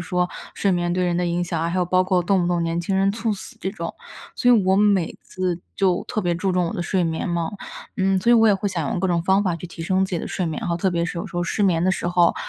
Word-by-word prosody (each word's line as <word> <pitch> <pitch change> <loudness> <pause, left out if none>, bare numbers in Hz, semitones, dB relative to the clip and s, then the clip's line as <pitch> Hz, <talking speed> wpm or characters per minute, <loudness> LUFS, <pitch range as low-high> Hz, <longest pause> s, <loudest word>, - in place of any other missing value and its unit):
说， 180 -1 0 0.3
睡 200 - +1
眠 175 -1 0
对 180 0 +1
人 175 -1 0
的 180 - 0
影 175 +1 0
响 170 -2 -2
啊， 165 - 0
还 185 - -1
有 180 - +2
包 185 +1 +3
括 185 -1 +1
动 185 0 +2
不 175 - 0
动 175 -1 +1
年 165 0 -1
轻 190 +3 -1
人 195 +1 +3
猝 225 +1 -1
死 200 - -8
这 190 - -2
种， 170 -3 -6 0.4
所 245 - +3
以 230 -4 +5
我 190 0 +3
每 200 -4 +2
次 180 -2 -3 0.2
就 185 -3 +2
特 215 - -1
别 175 -2 0
注 190 +3 -1
重 180 -1 +1
我 - - -3
的 - - -3
睡 180 0 0
眠 165 +1 -2
嘛。 170 -1 -1 0.5
嗯， 190 0 +2
所 210 +6 +2
以 240 - +7
我 225 -1 +6
也 205 - +5
会 200 +1 -1
想 170 -7 -2
用 - - -1
各 190 - 0
种 170 -2 +1
方 190 +3 +3
法 180 -3 +1
去 170 +2 -7
提 170 - -11
升 190 +3 +1
自 190 - -6
己 175 - -1
的 - - -5
睡 185 - -2
眠 170 +6 -3
哈， 170 - 0
特 190 +2 +1
别 170 -1 0
是 175 0 -4
有 180 - -4
时 190 - -9
候 175 - 0
失 205 - -1
眠 175 -3 +2
的 185 - +3
时 175 - -2
候， 175 -1 +3
180 Hz, 335 characters per minute, -22 LUFS, 170-190 Hz, 0.5 s, 以